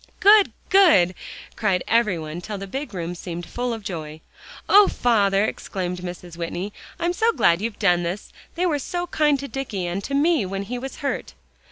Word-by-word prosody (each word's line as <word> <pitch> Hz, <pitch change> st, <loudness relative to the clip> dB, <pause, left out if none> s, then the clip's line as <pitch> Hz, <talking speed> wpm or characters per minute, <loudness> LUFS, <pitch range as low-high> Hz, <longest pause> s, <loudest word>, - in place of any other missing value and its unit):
"Good, 410 Hz, 0 st, +6 dB, 0.2 s
good!" 315 Hz, -, +6 dB, 0.4 s
cried 195 Hz, -5 st, 0 dB
every 225 Hz, -6 st, +2 dB
one 155 Hz, +2 st, -6 dB
till 210 Hz, +3 st, -5 dB
the 195 Hz, -, -6 dB
big 270 Hz, +9 st, -5 dB
room 175 Hz, -3 st, -4 dB
seemed 175 Hz, 0 st, -6 dB
full 245 Hz, +7 st, -3 dB
of 225 Hz, -2 st, -5 dB
joy. 160 Hz, -6 st, -6 dB, 0.5 s
"Oh, 410 Hz, 0 st, +7 dB
father!" 205 Hz, -4 st, +2 dB
exclaimed 180 Hz, -4 st, -4 dB
Mrs. 175 Hz, -1 st, -8 dB
Whitney, 175 Hz, +4 st, -4 dB, 0.3 s
"I'm 345 Hz, +1 st, 0 dB
so 450 Hz, +5 st, +2 dB
glad 170 Hz, -, +3 dB
you've 225 Hz, -1 st, -3 dB
done 180 Hz, -4 st, +3 dB
this. 175 Hz, +4 st, -5 dB, 0.2 s
They 355 Hz, +2 st, 0 dB
were 305 Hz, -5 st, +1 dB
so 350 Hz, +6 st, -3 dB
kind 300 Hz, -4 st, +2 dB
to 280 Hz, -, -5 dB
Dicky 245 Hz, -10 st, -4 dB
and 175 Hz, +3 st, -3 dB
to 275 Hz, -, -2 dB
me 310 Hz, -2 st, +3 dB
when 195 Hz, +1 st, -4 dB
he 245 Hz, +5 st, -5 dB
was 265 Hz, +2 st, -6 dB
hurt." -, -, -3 dB
205 Hz, 190 wpm, -23 LUFS, 180-275 Hz, 0.5 s, Oh